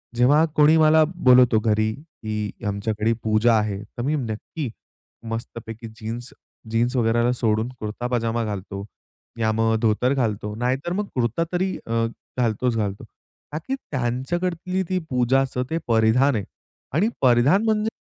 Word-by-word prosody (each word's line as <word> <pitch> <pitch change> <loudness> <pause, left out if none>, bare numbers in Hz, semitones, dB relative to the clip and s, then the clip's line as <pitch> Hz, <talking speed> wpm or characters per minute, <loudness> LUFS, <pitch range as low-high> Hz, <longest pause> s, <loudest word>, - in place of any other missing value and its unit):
जेव्हा 140 +6 +5
कोणी 150 +1 +6
मला 155 0 +6
बोलवतो 125 -7 +5
घरी, 110 0 +1
"की 110 -8 -5 0.2
आमच्याकडे 105 +2 0
पूजा 110 +2 +3
आहे." 105 -2 -1
तर 110 +2 -9
मी 145 +4 +1
नक्की 125 +3 -4 0.6
मस्तपैकी 115 0 -6
जीन्स 115 +3 -5 0.4
जीन्स 120 +3 +1
वगैरेला 120 0 +2
सोडून 110 -1 0
कुर्ता 110 +3 -4
पजामा 115 -1 0
घालतो, 100 -1 -5 0.5
या 110 -1 +2
मग 115 0 +2
धोतर 115 +4 +2
घालतो, 105 -5 -1
नाहीतर 130 +7 -1
मग 205 +1 -2
कुर्ता 120 +6 +1
तरी 185 +1 0
अ, 115 0 +1 0.3
घालतोच 120 0 +1
घालतो. 100 -2 -2 0.5
का 150 - -3
की 270 - 0
त्यांच्याकडतील 170 - -2
ती 185 -1 +1
पूजाचं 125 0 +1
ते 165 - -1
परिधान 115 +4 +3
आहे 105 - -1 0.5
आणि 195 +9 +2
परिधान 130 - +4
म्हणजे 215 0 +1
120 Hz, 140 wpm, -23 LUFS, 110-140 Hz, 0.6 s, कोणी